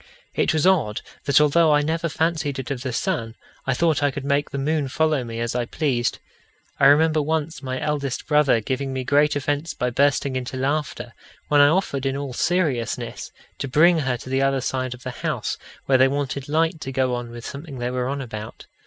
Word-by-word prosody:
It - - +2
was 155 0 +1
odd 155 - +2 0.2
that, 140 0 +5
although 155 +2 +4
I 145 - +3
never 165 +2 -1
fancied 160 -3 -1
it 135 +2 -5
of 130 -3 -3
the 130 -1 -3
sun, 120 - -2 0.3
I 130 - +2
thought 160 0 +2
I 145 - +3
could 140 0 -6
make 140 0 +1
the 140 - -5
moon 145 +1 0
follow 155 0 +1
me 115 -1 -6
as 115 0 -2
I 120 -1 -1
pleased. 125 -3 -1 0.6
I 135 - +7
remember 155 +2 +5
once 155 -1 -2
my 130 -1 -3
eldest 140 -4 -2
brother 150 -6 +3
giving 135 +4 -2
me 130 -1 -2
great 145 +3 +3
offence 145 +3 -2
by 125 0 -1
bursting 140 +1 +2
into 130 0 -4
laughter, 140 -3 -2 0.4
when 145 -1 +5
I 145 - +8
offered, 145 -5 0
in 135 0 -1
all 140 -2 -4
seriousness, 125 -8 -1 0.3
to - - -2
bring 165 +6 +5
her 130 -4 0
to 130 - -10
the 135 0 +2
other 135 0 +2
side 130 0 -2
of 125 - -17
the 130 - -4
house - - -2 0.3
where 130 -1 +3
they 130 - +6
wanted 140 0 -3
light 160 +1 +1
to 135 - -4
go 130 -1 +1
on 120 -1 -4
with 120 0 -9
something 140 0 -7
they 120 0 -2
were 125 0 -1
about. 115 -6 -6
140 Hz, 210 wpm, -23 LUFS, 130-150 Hz, 0.6 s, I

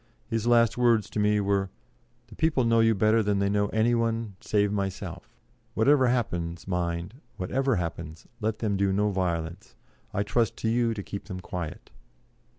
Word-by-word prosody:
His 115 - -2
last 120 0 +4
words 115 -4 +3
to - - -2
me 105 0 +3
were: 100 -1 0 0.6
"The 115 -2 -14
people 155 -5 +2
know 115 0 +3
you 115 0 +4
better 110 +3 +3
than 105 -1 +1
they 100 0 +1
know 100 0 +2
any 110 +3 +2
one, 115 -3 -1
save 105 -1 +1
myself; 95 -3 -4 0.4
whatever 130 +3 +4
happens, 85 -9 -2
mind, 90 - -3 0.2
whatever 130 +7 0
happens, 85 -2 -5
let 110 -1 -1
them 105 -3 -1
do 100 0 +2
no 105 +2 +1
violence; 90 +3 -3 0.4
I 100 -1 0
trust 115 +2 0
to 110 - -1
you 115 0 +1
to 100 - -5
keep 100 - -7
them 95 -4 -6
quiet." 90 -3 -6
105 Hz, 170 wpm, -27 LUFS, 95-115 Hz, 0.6 s, last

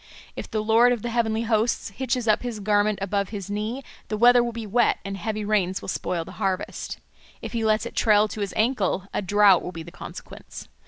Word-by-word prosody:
If - - -7
the 215 -1 -2
Lord 230 +3 +5
of 235 - -5
the 240 - -3
Heavenly 225 -1 0
Hosts 225 -1 0
hitches 250 +1 -2
up 215 - +3
his 240 -3 -5
garment 205 0 +2
above 200 0 -1
his 205 -2 -6
knee, 215 +6 -3 0.2
the 215 - -3
weather 240 +2 +6
will 240 - -2
be 230 -1 -6
wet 235 +4 +2
and 195 0 -4
heavy 210 +2 -3
rains 195 -3 +1
will - - -7
spoil 170 -2 -2
the - - -10
harvest. 190 0 -2 0.4
If - - -7
he 230 -1 -1
lets 215 +1 +2
it - - -7
trail 210 -1 +4
to 215 - -6
his 200 - -3
ankle, 215 -5 +1
a - - -1
drought 205 -2 +5
will - - -6
be 165 -2 -7
the 170 - -11
consequence. - - -10
215 Hz, 220 wpm, -24 LUFS, 200-230 Hz, 0.4 s, weather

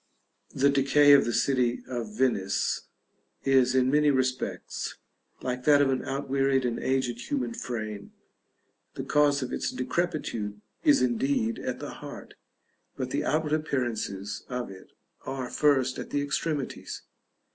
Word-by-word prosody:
The 140 +1 +4
decay 140 +1 +5
of 140 - +6
the 120 - 0
city 125 -1 +1
of 115 -4 -5
Venice 100 -7 0 0.6
is, 130 -2 +4
in 130 0 +3
many 150 0 +4
respects, 130 -2 -1 0.5
like 125 0 -2
that 145 -1 +6
of 140 -1 +4
an 130 - 0
outwearied 135 -1 0
and 120 -1 -1
aged 125 -2 -1
human 270 -4 -1
frame; 110 - -5 0.8
the - - -4
cause 145 -2 +3
of 125 - -5
its - - -1
decrepitude 130 -9 -2 0.2
is 295 -3 +5
indeed 240 -1 +1
at - - -3
the - - -6
heart, - - -9 0.6
but - - -3
the - - 0
outward 155 -1 0
appearances 120 -9 -2
of 125 -5 -3
it 95 -1 -13 0.4
are 130 -2 -4
first 135 -4 +2
at - - -6
the 145 0 0
extremities. 145 0 -3
135 Hz, 140 wpm, -28 LUFS, 125-145 Hz, 0.8 s, of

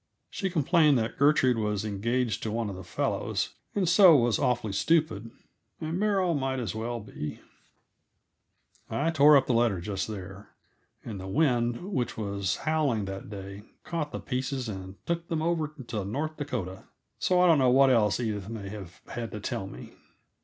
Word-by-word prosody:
She 195 - -2
complained 155 -3 +4
that 110 -1 -2
Gertrude 135 -4 +4
was 105 -1 -1
engaged 115 +2 -1
to 110 - -3
one 110 -2 -2
of - - -7
the 95 - -8
fellows, 85 - -1 0.3
and 195 -3 +1
so 180 -1 +8
was 120 -5 +3
awfully 120 -6 0
stupid; 150 -4 +1 0.5
and 160 +3 -3
Beryl 195 -4 +2
might 135 -2 -1
as 120 - -3
well 115 +2 -3
be 75 -8 -7 1.5
I 160 +3 0
tore 150 -1 +7
up 135 - +2
the 125 - +1
letter 115 -5 +2
just 95 +2 -3
there, 100 -1 -8 0.6
and 105 -4 -6
the 95 - -7
wind, 120 - +1
which 125 -7 -1
was 100 -3 -1
howling 150 -9 +1
that 95 +1 -7
day, 100 -1 -8 0.2
caught 160 -3 -3
the - - -4
pieces 130 -1 -3
and 95 -2 -6
took 170 0 -2
them 160 -1 -1
over 160 -3 0
into 115 -6 -4
North 145 +11 -3
Dakota; 95 - -5 0.3
so 180 -1 +2
I 180 - +6
don't 165 -4 +5
know 130 -1 +4
what 135 +1 +6
else 105 -5 +3
Edith 105 -4 -3
may 105 -4 -6
have 95 -4 -9
had 115 -1 -4
to 105 - -4
tell 95 -1 -3
me. - - -10
120 Hz, 175 wpm, -28 LUFS, 105-150 Hz, 1.5 s, so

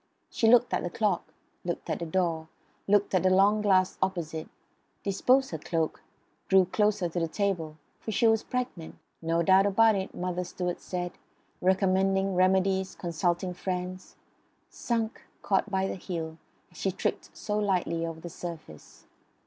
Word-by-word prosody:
She 225 - +2
looked 245 +1 +5
at - - +1
the 175 - -3
clock; 205 -1 -1 0.3
looked 175 -1 -4
at - - -2
the 170 - -4
door; 165 -2 0 0.4
looked 205 0 +3
at 185 - +4
the 185 - +3
long 200 +3 +4
glass 185 -3 +2
opposite; 165 -4 -2 0.5
disposed 255 +7 +2
her 160 - -4
cloak; 165 0 -2 0.5
drew 190 -1 +5
closer 210 0 +1
to 170 +1 -3
the 165 - 0
table, 165 -4 -2 0.2
for - - -7
she 225 - +2
was 225 -1 +4
pregnant 250 -10 -4 0.3
no 165 +1 +1
doubt 190 +3 +5
about 220 +3 +5
it, 190 -1 -3
Mother 180 0 -2
Stuart 180 0 -4
said, 175 -1 -4 0.5
recommending 190 +1 +2
remedies, 190 +1 +2
consulting 175 +1 -1
friends; 180 +1 -5 0.6
sunk, 230 -2 -2 0.2
caught 200 +1 +1
by 190 -1 0
the - - -2
heel, 165 -3 -5 0.3
as - - -17
she - - 0
tripped - - -3
so 210 0 -2
lightly 180 -5 0
over 165 -1 -4
the 175 - -7
surface. 160 - -9
185 Hz, 155 wpm, -28 LUFS, 175-200 Hz, 0.6 s, looked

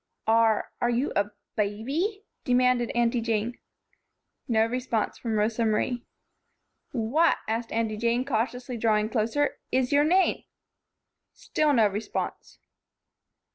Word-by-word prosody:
"Are 225 -1 +3
are 240 - +2
you 245 +4 0
a 200 0 +1 0.3
baby?" 275 - -1 0.2
demanded 250 -1 +2
Aunty 235 0 +2
Jane. 230 +1 -1 0.9
No 220 -3 +3
response 240 -2 -2
from 225 -2 -2
Rosa 220 +2 +1
Marie. 235 +3 0 0.9
"What," 275 +8 +2
asked 225 +1 -2
Aunty 225 -1 -1
Jane, 235 +3 +1
cautiously 245 0 -2
drawing 215 -1 +2
closer, 235 +6 0
"is 260 -1 +1
your 290 0 +5
name?" 365 +5 +2 0.9
Still 305 -1 0
no 225 -5 +5
response. 205 +2 -5
235 Hz, 115 wpm, -27 LUFS, 220-255 Hz, 0.9 s, your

